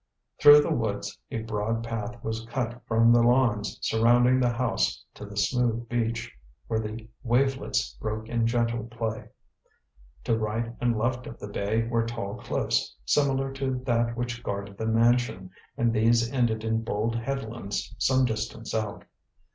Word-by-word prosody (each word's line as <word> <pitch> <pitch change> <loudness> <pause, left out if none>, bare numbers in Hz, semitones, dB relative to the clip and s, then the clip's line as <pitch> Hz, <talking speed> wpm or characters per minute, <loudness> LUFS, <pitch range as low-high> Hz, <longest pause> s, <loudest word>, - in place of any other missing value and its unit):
Through 145 0 +9
the 160 - 0
woods 105 -5 -2
a 115 - -3
broad 110 +1 -2
path 115 +1 -5
was 110 0 -3
cut 120 0 -3
from 115 +1 +5
the 120 - +5
lawns 120 -4 +2
surrounding 120 +3 +4
the 125 -1 +3
house 120 +1 0
to 105 - -9
the 105 0 -10
smooth 120 +2 +1
beach, 115 0 -2 0.3
where 110 -1 -1
the 110 +1 -6
wavelets 130 - +1
broke 110 +1 -3
in 115 -1 +1
gentle 115 -1 0
play. 115 -1 -4 0.9
To 115 - +1
right 110 +2 -2
and 120 -2 +2
left 125 +3 -1
of - - -8
the 105 - -8
bay 105 +3 0
were 115 -1 +1
tall 115 -4 -4
cliffs, - - -1
similar 135 - +1
to 135 -1 -2
that 115 -1 +1
which 120 -1 -3
guarded 100 -2 -5
the 110 - -2
mansion, 115 -5 +2 0.3
and 120 -1 +2
these 115 +2 +3
ended 115 -4 +1
in 110 0 0
bold 110 +1 -1
headlands 115 -4 -4
some 130 -1 +3
distance 110 0 -4
out. 110 -2 -3
115 Hz, 155 wpm, -27 LUFS, 110-120 Hz, 0.9 s, Through